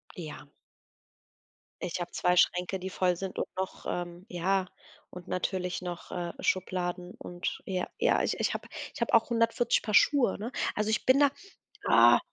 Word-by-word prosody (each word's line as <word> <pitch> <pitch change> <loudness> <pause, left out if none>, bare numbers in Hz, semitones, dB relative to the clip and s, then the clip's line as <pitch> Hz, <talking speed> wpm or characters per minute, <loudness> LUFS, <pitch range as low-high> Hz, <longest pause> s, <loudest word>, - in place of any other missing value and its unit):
Ja. 155 -4 -8 1.3
Ich 180 0 -3
habe 175 0 -4
2 180 0 +2
Schränke, 180 +2 +2
die 190 +1 -5
voll 180 -1 +1
sind 190 +1 -6
und - - -1
noch, 190 0 -4
ähm 175 +1 -4
ja, 185 +2 0 0.4
und 180 -1 -11
natürlich 185 0 -2
noch, 175 -1 -6
äh, 175 -1 -3
Schubladen 180 -1 -1
und 175 +1 -5
ja, 185 -2 -2
ja, - - +3
ich - - -1
ich - - +1
habe - - -5 0.3
ich - - -10
habe 235 - 0
auch 230 +1 +5
140 230 0 +2
Paar 215 - -4
Schuhe, 255 0 +4
ne? 225 +4 -4 0.2
Also, 215 +1 -1
ich 220 - 0
bin 260 +2 +5
da, 285 -1 +6 0.6
ah 120 +1 +7
185 Hz, 170 wpm, -29 LUFS, 175-205 Hz, 1.3 s, ah